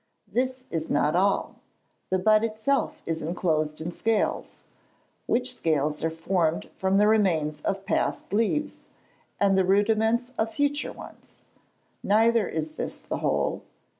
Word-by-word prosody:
This 255 +1 -1
is 160 -1 -3
not 150 +2 +2
all. 195 +2 +1 0.5
The 185 - +2
bud 215 +3 +4
itself 230 +5 -1
is 165 0 -2
enclosed 155 -2 -1
in 160 +2 -4
scales; 220 +4 -1 0.7
which 250 +1 0
scales 150 - 0
are 160 - +2
formed 165 0 -1
from 190 +1 +1
the 210 +1 +5
remains 165 -9 +2
of 195 +3 -2
past - - -1
leaves, 230 +8 0 0.6
and 200 -1 +3
the 190 - +4
rudiments 220 +5 +2
of 220 0 0
future 285 +3 0
ones. - - -13 0.7
Neither 225 0 +3
is 155 -1 -3
this - - -4
the - - -5
whole. - - 0
195 Hz, 135 wpm, -26 LUFS, 160-225 Hz, 0.7 s, the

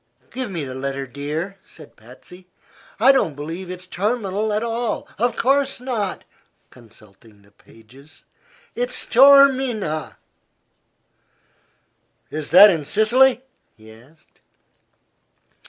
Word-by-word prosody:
"Give 255 -1 -5
me 170 -6 -5
the 130 -2 -7
letter, 135 +1 -5
dear," 150 +9 -6
said 155 -3 -17
Patsy. 155 +11 -16 0.5
"I 255 +5 +6
don't 200 - 0
believe 165 +6 -7
it's 180 0 -8
Terminal 210 +2 -3
at 210 +2 -1
all. 235 0 -3
Of 245 +2 0
course 275 +1 0
not," 230 -7 -4 0.5
consulting 110 -3 -19
the 100 - -25
pages, 125 +9 -20 0.5
"it's - - -3
Taormina." 260 - +3 2.1
"Is 155 -1 -6
that 195 +5 +8
in 160 -4 -3
Sicily?" 245 - +2 0.3
he 110 0 -16
asked. 135 +8 -23
185 Hz, 105 wpm, -20 LUFS, -, 2.1 s, that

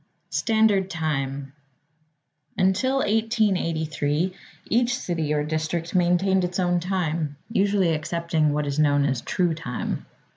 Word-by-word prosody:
Standard 220 -4 +2
Time 140 -5 -3 1.0
Until 195 +8 +2
1883, 185 -7 0 0.3
each 240 +1 +1
city 165 -8 -2
or 150 -1 +1
district 155 +2 -2
maintained 185 +1 +3
its 180 +1 -2
own 175 -1 +2
time, 170 -5 -2 0.2
usually 195 -5 +2
accepting 160 0 0
what 150 0 0
is 140 +1 -2
known 145 -2 +3
as 130 -3 0
True 175 -3 0
Time. 155 -6 -4
170 Hz, 115 wpm, -24 LUFS, 150-190 Hz, 1.0 s, maintained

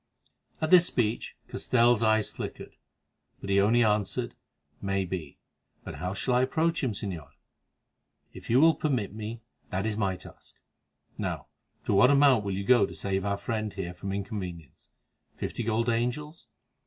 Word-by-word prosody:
At 155 - 0
this 180 -1 +8
speech 115 -2 -1
Castell's 120 -2 +2
eyes 110 -1 +3
flickered, - - -7 0.6
but 100 - -5
he 100 0 +5
only 115 +4 +4
answered: 105 -2 0 0.5
"May 95 -1 0
be; 85 -6 -6 0.5
but - - -7
how 90 +1 -3
shall 125 +5 0
I 125 - +4
approach 160 +6 +1
him, 125 -5 0
Señor?" 90 -8 -5 1.0
"If - - -11
you 120 +3 +5
will 165 +2 +7
permit 125 -12 -1
me, 110 +2 -6 0.3
that 95 +2 -2
is 110 -1 -1
my 95 -3 0
task. 90 - -13 0.6
Now, - - -3 0.4
to - - +1
what 100 +6 +6
amount 140 -5 +5
will 100 -1 -2
you 100 - -2
go 115 -2 +5
to 85 - -10
save 95 +4 -2
our 100 0 0
friend 110 +1 -3
here 90 -3 -5
from 95 +2 -6
inconvenience? 95 - -6 0.5
Fifty - - -4
gold 115 +1 0
angels?" 125 +7 -2
110 Hz, 160 wpm, -28 LUFS, 95-120 Hz, 1.0 s, this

